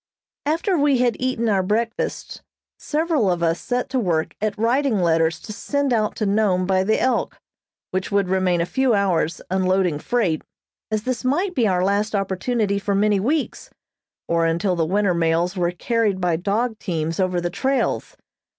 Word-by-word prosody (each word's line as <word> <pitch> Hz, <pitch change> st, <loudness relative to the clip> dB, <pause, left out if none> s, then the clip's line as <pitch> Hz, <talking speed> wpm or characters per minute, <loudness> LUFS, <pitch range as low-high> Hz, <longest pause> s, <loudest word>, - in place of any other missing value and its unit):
After 335 Hz, +5 st, +1 dB
we 285 Hz, -2 st, +3 dB
had 245 Hz, -1 st, +2 dB
eaten 255 Hz, -2 st, -1 dB
our 200 Hz, -3 st, +2 dB
breakfasts, 225 Hz, +5 st, -2 dB, 0.4 s
several 305 Hz, -, 0 dB
of 175 Hz, -1 st, -1 dB
us 165 Hz, 0 st, +1 dB
set 250 Hz, 0 st, -2 dB
to 260 Hz, -, +1 dB
work 170 Hz, -7 st, 0 dB
at 215 Hz, -1 st, -1 dB
writing 235 Hz, +1 st, +1 dB
letters 165 Hz, -1 st, +2 dB
to 215 Hz, -, -7 dB
send 280 Hz, +5 st, -1 dB
out 215 Hz, -2 st, 0 dB
to 215 Hz, -, -2 dB
Nome 195 Hz, -3 st, +2 dB
by 190 Hz, 0 st, +2 dB
the 220 Hz, +3 st, +1 dB
"Elk," 260 Hz, -, 0 dB, 0.5 s
which 185 Hz, 0 st, -2 dB
would 200 Hz, -1 st, +2 dB
remain 185 Hz, -2 st, +1 dB
a -, -, +1 dB
few 265 Hz, +3 st, +1 dB
hours 180 Hz, -5 st, 0 dB
unloading 185 Hz, -4 st, +1 dB
freight, 185 Hz, -7 st, 0 dB, 0.5 s
as 215 Hz, -1 st, -1 dB
this 255 Hz, -1 st, -2 dB
might 345 Hz, +9 st, 0 dB
be 240 Hz, -9 st, +2 dB
our 180 Hz, -2 st, +1 dB
last 205 Hz, +2 st, 0 dB
opportunity 200 Hz, +2 st, 0 dB
for 200 Hz, 0 st, -1 dB
many 205 Hz, 0 st, +2 dB
weeks, 285 Hz, +9 st, -2 dB, 0.6 s
or 170 Hz, 0 st, +1 dB
until 180 Hz, +3 st, 0 dB
the 165 Hz, -2 st, 0 dB
winter 200 Hz, +1 st, +2 dB
mails 170 Hz, +2 st, +1 dB
were 175 Hz, -2 st, +1 dB
carried 210 Hz, +2 st, 0 dB
by 175 Hz, -2 st, +1 dB
dog 215 Hz, +6 st, -1 dB
teams 165 Hz, -3 st, -3 dB
over 185 Hz, -1 st, +1 dB
the 175 Hz, 0 st, -2 dB
trails. 265 Hz, +8 st, -1 dB
200 Hz, 175 wpm, -22 LUFS, 180-235 Hz, 0.6 s, we